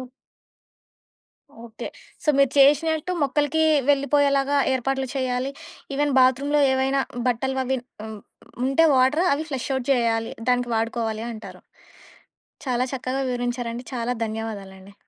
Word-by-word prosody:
ఒ - - -5 1.6
okay. 225 -1 -7 0.4
So, - - +1
మీరు 275 -2 +4
చేశినట్టు 305 +4 +4
మొక్కలకి 290 +3 +1 0.3
వెళ్ళిపోయేలాగా 280 0 +3 0.2
ఏర్పాట్లు 265 +1 -1
చేయాలి. 255 0 -1 0.4
ఈవెన్ 290 0 0
బాత్‌రూమ్‌లో 275 +3 +3
ఏవైనా 270 +1 +1 0.3
బట్టలు 265 +2 0
అవి 260 +1 -1 0.3
హ్మ్. 220 -1 -7 0.5
ఉంటే 275 +5 +4
వాటర్ 265 +7 +3
అవి 295 +2 -2
ఫ్లష్ 265 -2 -4
ఔట్ 260 -1 -3
జేయాలి. 230 -3 +1 0.2
దానికి 245 -1 +1
వాడుకోవాలి 225 -1 -2
అంటారు. 220 -1 -10 1.1
చాలా 250 -1 +1
చక్కగా 260 +1 -2
వివరించారండి. 245 0 -3
చాలా 240 +1 -1
ధన్యవాదాలండి. 200 -3 -7
260 Hz, 115 wpm, -23 LUFS, 235-275 Hz, 1.6 s, మీరు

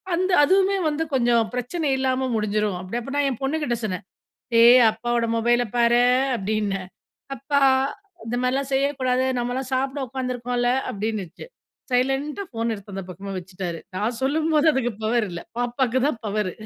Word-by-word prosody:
அந்த 370 +2 0
அதுவுமே 390 +3 +3
வந்து 300 +2 -1
கொஞ்சம் 235 -3 +2
பிரச்சனை 280 +6 -2
இல்லாம 260 0 0
முடிஞ்சிரும். 210 -2 0
அப்படி 185 +6 -4
அப்போ 270 +4 -7
நான் 285 -1 +2
என் 250 - -7
பொண்ணுகிட்ட 270 -3 -1
சொன்னேன். 185 -4 -4 0.6
"ஏய்! 245 +2 +8
அப்பாவோட 235 +1 -1
மொபைல 240 +1 +2
பாரு" 240 0 +4 0.4
அப்படீன்னேன். 200 -2 -2 0.5
"அப்பா, 280 +3 0 0.7
இந்த 235 +2 -2
மாரில்லாம் 265 +2 0
செய்யக்கூடாது. 260 -2 +1
நம்மல்லாம் 250 +2 -3
சாப்பிட 270 +2 -1
உட்காந்துருக்கோம்ல" 245 -1 -1 0.2
அப்படின்னுச்சு. 205 -4 -4 0.5
சைலண்டா 270 +8 0
ஃபோன் 230 -1 -2
எடுத்து 200 -1 -10
அந்த 195 - -4
பக்கமா 195 +2 -7
வச்சுட்டாரு. 180 -1 -6 0.2
நான் 225 +4 -2
சொல்லும்போது, 310 +2 +2
அதுக்கு 245 -3 0
பவர் 225 0 +1
இல்லை. 170 -1 -7
பாப்பாவுக்கு 245 +1 0
தான் 265 -6 -2
பவரு. 210 -2 -1
245 Hz, 145 wpm, -23 LUFS, 215-270 Hz, 0.7 s, ஏய்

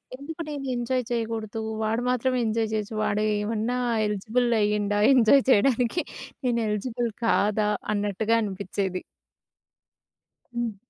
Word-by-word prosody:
ఎందుకు 310 +5 -8
నేను 285 -2 -5
ఎంజాయ్ 245 +1 -1
చెయ్యకూడదు? 225 -2 -2 0.2
వాడు 225 +2 0
మాత్రమే 255 0 +1
ఎంజాయ్ 220 0 0
చెయచ్చు. 215 0 -2
వాడూ 210 +1 0 0.2
ఏమన్నా 225 +3 -1 0.3
ఎలిజిబుల్ 220 +4 0
అయ్యిండా, 205 0 +1 0.2
ఎంజాయ్ 255 +2 +6
చెయ్యడానికి? 250 - +3 0.4
నేనెలిజిబుల్ 235 0 -1 0.2
కాదా?" 210 -1 +2 0.2
అన్నట్టుగా 210 +2 0
అనిపిచ్చేది. 190 -2 -3 1.5
హ్మ్. 235 -3 -2
225 Hz, 105 wpm, -26 LUFS, 210-245 Hz, 1.5 s, ఎంజాయ్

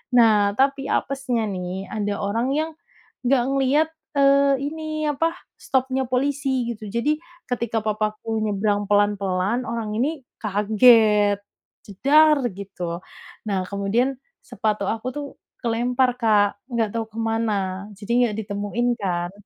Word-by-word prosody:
Nah 210 -4 +5
tapi 275 0 +2
apesnya 260 -5 -1
nih 185 0 -5
ada 205 -2 -2
orang 225 +5 0
yang 315 +2 -1 0.5
nggak 250 0 +3
ngeliat, 275 +4 +2 0.3
eee, 280 0 +5 0.2
ini 310 -1 -4
apa 325 +4 0 0.2
stop-nya 265 0 0
polisi 265 -1 0
gitu, 215 -2 -6
jadi 235 +7 +1 0.3
ketika 235 -2 -1
papaku 215 +1 -1
nyebrang 205 0 0
pelan-pelan 205 +2 +1
orang 230 -2 -3
ini 295 +6 0 0.2
kaget, 210 -1 +4 0.5
"jedar" 295 +9 +4
gitu, 180 -3 -5 0.5
nah 195 -3 0
kemudian 225 +7 0 0.3
sepatu 215 -2 -2
aku 225 +2 -2
tuh 290 -1 -4 0.4
kelempar 245 +2 +1
Kak 205 -2 +3
nggak 230 -3 0
tahu 225 - -1
kemana, 215 -4 -1
jadi 205 +3 -6 0.2
nggak 210 - -4
ditemuin 205 +4 -2
kan. 175 -2 -1
225 Hz, 120 wpm, -23 LUFS, 205-265 Hz, 0.5 s, Nah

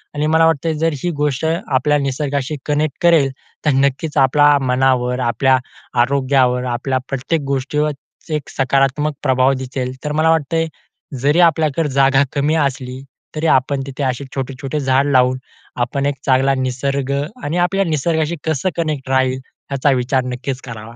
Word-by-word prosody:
आणि 150 +1 0
मला 165 0 +5
वाटतं 160 0 +1
जर 165 - +2
ही 175 - 0
गोष्ट 145 0 0 0.2
आपल्या 145 +2 +2
निसर्गाशी 140 +1 -2
कनेक्ट 150 -1 -1
करेल 160 -6 +4 0.3
तर 150 - +4
नक्कीच 140 +3 0
आपल्या 145 +2 +5
मनावर, 125 -1 +1
आपल्या 130 +2 +2 0.4
आरोग्यावर, 130 -1 +2
आपल्या 125 +2 -1
प्रत्येक 140 +4 -1
गोष्टीवर 150 +3 0 0.4
एक 150 -2 -3
सकारात्मक 135 +3 +1
प्रभाव 130 -1 +3
दिसेल. 130 -1 -4
तर 150 - -2
मला 155 +1 +2
वाटतंय 165 +1 +1 0.5
जरी 145 +5 +3
आपल्याकडे 160 -2 +2
जागा 135 0 +3
कमी 150 +2 +1
असली 130 -3 -2 0.3
तरी 160 +1 -1
आपण 135 0 +2
तिथे 140 +1 -5
असे 130 +1 -1
छोटे-छोटे 135 +2 -4
झाड 135 0 +2
लावून 130 0 +3 0.4
आपण 135 +3 -1
एक 145 0 0
चांगला 135 0 +3
निसर्ग 135 +1 -2 0.3
आणि 160 +4 -2
आपल्या 190 +2 +1
निसर्गाशी 160 +1 0
कसं 160 +3 0
कनेक्ट 150 -5 -2
राहील 130 -1 +1 0.3
याचा 140 +1 +2
विचार 130 0 +1
नक्कीच 130 +1 -4
करावा. 115 -1 -9
140 Hz, 150 wpm, -18 LUFS, 130-150 Hz, 0.5 s, मला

